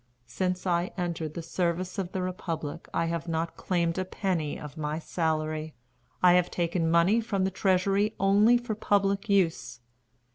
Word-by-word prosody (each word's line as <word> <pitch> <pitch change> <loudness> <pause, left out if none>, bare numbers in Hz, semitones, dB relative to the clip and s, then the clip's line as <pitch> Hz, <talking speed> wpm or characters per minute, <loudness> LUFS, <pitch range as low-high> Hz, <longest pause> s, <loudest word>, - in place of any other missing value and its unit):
Since 180 +9 -2
I 175 0 +1
entered 170 -4 -3
the 170 - -4
service 180 +3 -2
of 185 -2 -3
the 185 - -2
republic 165 -5 -4
I 165 - 0
have 165 0 -3
not 165 0 -2
claimed 170 -1 0
a - - +1
penny 185 -5 -2
of 150 -1 -9
my 155 -1 -3
salary. 155 -2 -2 0.5
I 180 -1 +7
have 180 0 +3
taken 170 -1 0
money 170 +7 +4
from 205 -4 -1
the 190 - 0
treasury 195 +3 +1
only 205 +5 +5
for 240 -2 -4
public 200 0 +1
use. 160 - +1
175 Hz, 160 wpm, -28 LUFS, 165-195 Hz, 0.5 s, I